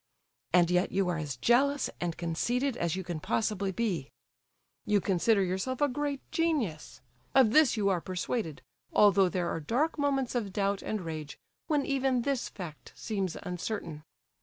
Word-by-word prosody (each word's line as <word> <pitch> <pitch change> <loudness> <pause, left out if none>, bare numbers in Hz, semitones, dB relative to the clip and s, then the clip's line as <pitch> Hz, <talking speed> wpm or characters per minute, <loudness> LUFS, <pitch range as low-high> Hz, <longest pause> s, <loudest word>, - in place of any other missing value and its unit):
And 175 0 +4
yet 180 +2 +2
you 195 -1 +1
are 170 -2 -1
as 145 -5 -4
jealous 270 - +3
and 170 -2 -2
conceited 240 +11 0
as 170 -6 -1
you 190 - -3
can 175 -3 -4
possibly 200 +2 -1
be; 190 - -2 0.7
you 210 -2 +2
consider 195 +2 +2
yourself 190 +8 -2
a 290 - +4
great 285 +1 -2
genius; 285 - -1 0.3
of 260 -5 +6
this 305 -3 +5
you 205 -2 +1
are 180 -3 +1
persuaded, 185 - -3 0.3
although 200 -2 +5
there 175 -1 -1
are - - -2
dark 265 - 0
moments 275 -3 +1
of 225 -6 -2
doubt 200 0 0
and 215 -2 -3
rage, 155 -3 -6 0.3
when 295 -3 +1
even 265 -3 +1
this 275 -2 -1
fact 170 -6 -9
seems 195 -5 -3
uncertain. 180 -3 -4
200 Hz, 160 wpm, -30 LUFS, 175-255 Hz, 0.7 s, of